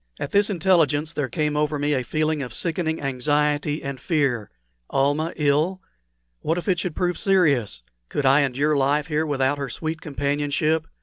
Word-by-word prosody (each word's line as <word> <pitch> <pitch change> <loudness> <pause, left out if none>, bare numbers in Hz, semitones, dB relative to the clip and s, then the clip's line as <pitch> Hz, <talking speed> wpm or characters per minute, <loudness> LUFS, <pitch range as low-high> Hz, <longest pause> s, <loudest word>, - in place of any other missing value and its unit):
At - - -4
this 205 +1 +3
intelligence 165 -5 +2
there 145 -4 -2
came 150 -3 -1
over 150 0 0
me 145 +1 0
a 130 - +1
feeling 155 +4 -1
of 125 -4 -5
sickening 160 -1 -1
anxiety 145 +3 0
and 135 -1 -5
fear. 135 - 0 0.4
Almah 145 +4 +1
ill! 150 +5 +1 0.6
What 160 +3 -1
if 175 - -5
it 180 -3 +2
should 180 -3 -3
prove 180 -1 -1
serious? 140 - +2 0.3
Could 145 - -2
I 135 +3 +5
endure 140 +3 +1
life 140 +2 +2
here 155 0 -1
without 145 0 0
her 140 -2 -3
sweet 160 +5 -4
companionship? 145 +2 -1
150 Hz, 170 wpm, -23 LUFS, 140-160 Hz, 0.6 s, I